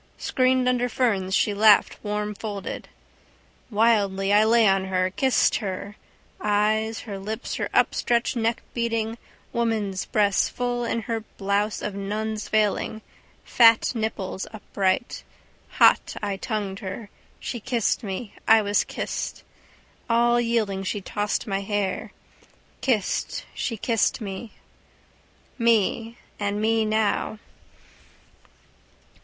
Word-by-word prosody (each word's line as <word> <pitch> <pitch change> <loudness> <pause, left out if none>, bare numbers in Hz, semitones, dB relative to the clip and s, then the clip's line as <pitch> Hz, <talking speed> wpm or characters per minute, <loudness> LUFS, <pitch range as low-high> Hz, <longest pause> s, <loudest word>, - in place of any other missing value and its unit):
Screened 255 0 +2
under 250 0 +1
ferns 195 -7 +1
she 210 - +2
laughed 210 0 +4
warmfolded. 210 -1 -4 0.8
Wildly 205 -3 +2
I 210 +1 +6
lay 225 +1 +5
on 195 -1 +2
her, 185 -1 0
kissed 260 +6 +2
her: 200 -1 -5 0.4
eyes, 215 +2 +1
her 200 -4 -6
lips, 215 +5 -5
her - - -2 0.2
stretched 235 +1 0
neck 230 0 0
beating, 230 -1 -1 0.3
woman's 215 -5 -1
breasts 205 -2 +2
full 245 -1 -2
in 230 0 -1
her 230 0 -2 0.2
blouse 200 +2 0
of 205 - -3
nun's 210 +2 -3
veiling, 215 0 0 0.4
fat 230 -2 +5
nipples 215 -4 -3
upright. 205 0 -1 0.6
Hot - - +5
I 205 -2 -2
tongued 200 -2 -3
her. 195 +2 -7 0.3
She 240 - -4
kissed 235 0 0
me. 200 0 -5
I 220 -1 +6
was 205 0 +2
kissed. - - -5 0.7
All 240 +1 +4
yielding 220 -5 0
she 195 +2 -2
tossed 205 +2 -2
my 195 -2 -1
hair. 200 -1 -2 0.7
Kissed, 225 -7 -1
she 230 - -3
kissed 225 +2 +1
me. 205 +1 -6 1.1
Me. 230 0 +2 0.2
And 205 0 -1
me 220 +1 +2
now. 215 0 0
215 Hz, 115 wpm, -25 LUFS, 200-230 Hz, 1.1 s, I